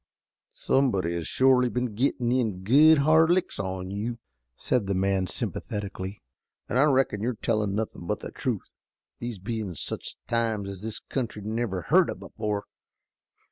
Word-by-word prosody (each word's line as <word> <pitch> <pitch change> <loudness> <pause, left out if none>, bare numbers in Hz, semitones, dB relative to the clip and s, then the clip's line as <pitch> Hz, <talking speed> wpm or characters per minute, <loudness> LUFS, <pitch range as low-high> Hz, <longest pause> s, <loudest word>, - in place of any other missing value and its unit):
"Somebody 100 -11 +1
has 85 -2 -3
shorely 130 -1 +4
been 125 -2 -2
gettin' 120 +1 0
in 110 -8 0
good 150 +9 +7
hard 155 +3 +5
licks 180 +1 +1
on 95 -1 -3
you," 110 +4 -3 0.4
said 120 -6 0
the 100 - 0
man 95 0 +1
sympathetically, 100 0 -4 0.4
"an' - - -1
I 145 - +6
reckon 130 -8 +2
you're 120 +2 -1
tellin' 105 -2 0
nothin' 105 -5 -4
but - - -1
the - - -6
truth, - - -3 0.5
these 120 -2 -4
bein' 105 -2 -4
such - - -5
times 115 -4 -1
as 95 -1 -8
this 110 0 -4
country 115 -6 -4
never 110 -4 -2
heard - - +4
of - - -5
before. 105 -2 -3
110 Hz, 155 wpm, -27 LUFS, 100-125 Hz, 0.5 s, good